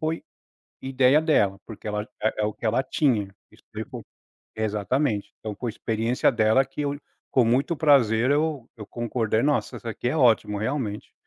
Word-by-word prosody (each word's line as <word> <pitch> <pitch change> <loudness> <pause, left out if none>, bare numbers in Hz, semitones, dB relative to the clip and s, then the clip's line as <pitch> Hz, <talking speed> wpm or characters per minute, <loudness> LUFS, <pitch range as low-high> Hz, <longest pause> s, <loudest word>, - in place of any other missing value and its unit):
foi 160 0 -2 0.6
ideia 130 +1 +4
dela, 100 - +2
porque 110 -1 -8
ela 105 0 -3 0.2
é 110 0 0
é - - +2
o 105 - -1
que 105 - -6
ela 120 +4 +2
tinha, 110 -10 0 0.2
isso - - -22
veio - - -5
co - - -8 0.5
exatamente. 110 +2 -1
Então 110 -1 -5
com 120 +5 -5
a - - 0
experiência 115 +2 0
dela 115 +3 +3
que 135 +3 -6
eu, 145 0 -2 0.3
com 125 - +4
muito 135 +8 +1
prazer, 130 -5 +4
eu 150 -4 0
eu 105 -3 -9
concordei: 115 -1 -1
"Nossa, 145 0 0
essa 115 - -6
aqui 120 - -4
é 155 - -1
ótimo, 115 -6 +3
realmente". 110 -1 -3
120 Hz, 180 wpm, -25 LUFS, 110-135 Hz, 0.6 s, ideia